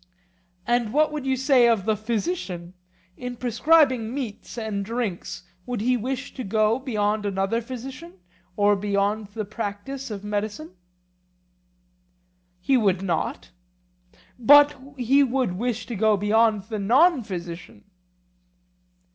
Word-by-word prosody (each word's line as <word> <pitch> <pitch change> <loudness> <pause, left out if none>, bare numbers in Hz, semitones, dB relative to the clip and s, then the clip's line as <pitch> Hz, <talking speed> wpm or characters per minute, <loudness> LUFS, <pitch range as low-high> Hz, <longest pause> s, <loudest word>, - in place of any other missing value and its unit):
And 240 -2 0
what 305 +1 +3
would 295 -3 -4
you 265 - +2
say 265 -2 +4
of 225 -5 +2
the 220 -1 +2
physician? 210 - -3 0.4
In 250 0 -6
prescribing 255 0 +3
meats 245 -3 -6
and 215 -3 -3
drinks 215 -5 -4 0.2
would 245 -3 -3
he 250 +4 +2
wish 255 +3 -4
to 255 - -6
go 215 +3 +1
beyond 215 -5 -1
another 195 +3 -1
physician 245 -6 -8 0.4
or 205 0 +4
beyond 200 +1 -1
the 215 +1 -5
practice 215 +6 -5
of 205 -2 -6
medicine? 205 -5 -4 1.9
He 270 +6 +3
would 195 -5 +1
not. 165 - -2 0.9
But 290 +4 +7 0.2
he 260 +3 +3
would 255 -6 +1
wish 240 -1 -2
to 235 - -5
go 215 +1 +3
beyond 215 0 +2
the 215 0 -5
non 265 - +4
physician? 175 -4 -8
225 Hz, 125 wpm, -24 LUFS, 205-255 Hz, 1.9 s, But